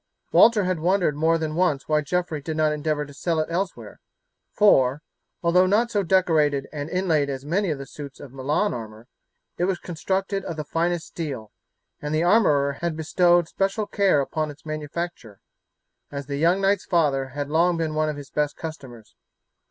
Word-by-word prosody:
Walter 225 -3 +6
had 185 -2 -1
wondered 175 -2 +2
more 160 +2 +2
than 160 -1 -3
once 165 -5 0
why 155 -1 +2
Geoffrey 165 -1 -2
did 155 +2 -4
not 155 -1 +3
endeavour 150 0 -1
to 145 - -13
sell 165 +3 -1
it 155 - -2
elsewhere, 185 +2 -4 0.5
for, 140 -8 +4 0.4
although 180 +2 +4
not 225 +5 +2
so 205 -3 +1
decorated 160 -7 +2
and 145 0 -4
inlaid 165 -6 +1
as 135 0 -5
many 185 +5 0
of 150 - -1
the 140 - -7
suits 140 -1 -10
of 135 -3 -11
Milan 145 +10 0
armour, 110 0 -8 0.5
it 175 - +2
was 190 -1 0
constructed 190 +3 -2
of 165 - -5
the 155 - -3
finest 170 +2 -1
steel, 135 -10 -6 0.5
and 150 +1 -2
the 160 - +2
armourer 150 -8 +3
had 170 -2 -2
bestowed 175 +1 +3
special 195 +4 -1
care 195 -8 +2
upon 155 +2 -2
its 145 +2 -12
manufacture, 155 - -5 0.7
as 140 -1 -5
the 140 +1 -4
young 170 +5 +3
knight's 195 0 +1
father 145 -7 +1
had 145 0 -3
long 170 +2 +3
been 160 -2 -1
one 155 0 +1
of 150 - -4
his 140 -2 -10
best 150 -1 -1
customers. 130 -9 -9
155 Hz, 185 wpm, -24 LUFS, 145-180 Hz, 0.7 s, Walter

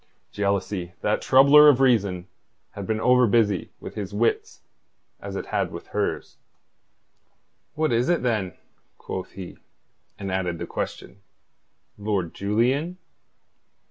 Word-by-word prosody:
Jealousy, 100 -3 -2
that 105 - 0
troubler 140 +3 +7
of 135 -3 +4
reason, 100 -9 +2 0.4
had 100 -2 -7
been 110 -1 -1
over 125 +1 +4
busy 105 -4 +1
with - - -9
his 100 -1 -6
wits 115 +2 -1 0.6
as - - -7
it - - -4
had - - -1
with - - -8
hers. - - -3 1.4
"What 155 0 0
is 120 +4 +1
it, 175 -5 +1
then?" 105 -8 -1 0.4
quoth 95 0 -6
he, 95 -2 -9 0.6
and 100 -2 -5
added 90 -2 -2
the - - -5
question: 95 +2 -6 0.8
"Lord 100 -5 -2
Julian?" 125 - 0
105 Hz, 125 wpm, -24 LUFS, 95-125 Hz, 1.4 s, troubler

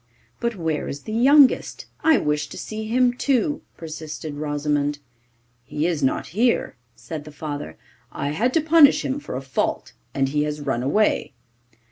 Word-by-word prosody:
'But 235 -1 -1
where 160 -4 -2
is 140 - -5
the 215 - -6
youngest? 270 +4 +4 0.2
I 320 -1 +5
wish 150 0 -1
to - - -10
see 215 0 -5
him 245 +2 +3
too,' 275 +3 0 0.2
persisted 155 -2 -7
Rosimond. 145 0 -1 0.7
'He 150 +5 -3
is 170 -4 0
not 130 - 0
here,' 230 +7 +1 0.2
said 120 +7 -7
the 150 - -11
father. 145 - -6 0.3
'I 140 - -3
had 225 - 0
to 325 - +4
punish 315 -2 +5
him 270 +1 -1
for - - -7
a 130 - -4
fault, 130 -1 -2 0.2
and 135 -1 +1
he 150 +1 0
has 150 0 -2
run 135 -5 -2
away. 150 +1 +1
155 Hz, 165 wpm, -23 LUFS, 145-240 Hz, 0.7 s, I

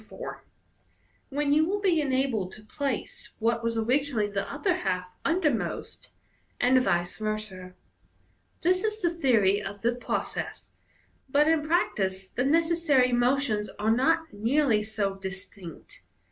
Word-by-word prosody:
4), - - -8 0.9
when 285 0 +1
you 310 +1 +5
will 390 +5 0
be 360 -6 +2
enabled 260 -9 0
to 215 - -12
place 275 0 -4
what 230 +1 0
was 230 0 -1
originally 250 0 +1
the 200 -1 -3
upper 355 +6 0
half 180 - -3
undermost, 325 -8 -1 0.5
and 255 +1 +4
vice 175 -5 0
versa. 215 -4 -4 0.9
This 365 +3 +2
is 430 0 -1
the 345 - +3
theory 225 - +3
of 200 +1 -7
the 235 +1 +3
process, 245 - -4 0.6
but 290 +3 +4
in 320 -1 +3
practice 195 - 0
tie 250 - -1
necessary 320 -4 +3
motions 240 -3 +1
are 215 +2 +1
not 320 +5 +2
nearly 230 +2 +2
so 210 -2 -2
distinct. 190 -3 -9
245 Hz, 130 wpm, -27 LUFS, 205-300 Hz, 0.9 s, you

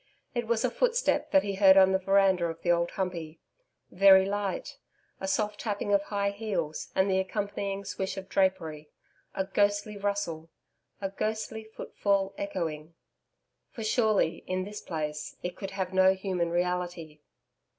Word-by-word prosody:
It 240 -2 -2
was 230 +1 +1
a 245 - 0
footstep - - +1
that 290 -1 +4
he 200 - -2
heard 190 -1 +6
on 190 0 +7
the 190 - +2
veranda 195 -2 +3
of 165 0 -7
the 175 - +3
Old 170 0 +2
Humpey 170 -4 -4 0.5
very 190 0 +7
light, 205 - -3 0.4
a 190 - -4
soft 210 +1 -1
tapping 205 -2 -2
of 200 - +4
high 200 -1 -1
heels 200 -7 -3
and 190 +1 +3
the 190 -1 +2
accompanying 200 0 -3
swish 190 0 -4
of 190 0 -6
drapery 170 -6 0 0.5
a 190 - 0
ghostly 205 +1 0
rustle 200 -5 -2 0.5
'a 195 -1 -2
ghostly 220 +2 -3
footfall 200 -2 -1
echoing.'... 165 - -4 0.7
For 225 - -7
surely 215 -6 +2
in 185 0 -1
this 210 +2 -7
place 150 -3 -4
it 180 0 -4
could 195 - -6
have 190 -1 -4
no 190 0 +5
human 185 -3 -1
reality. 175 -3 -2
195 Hz, 155 wpm, -29 LUFS, 180-205 Hz, 0.7 s, on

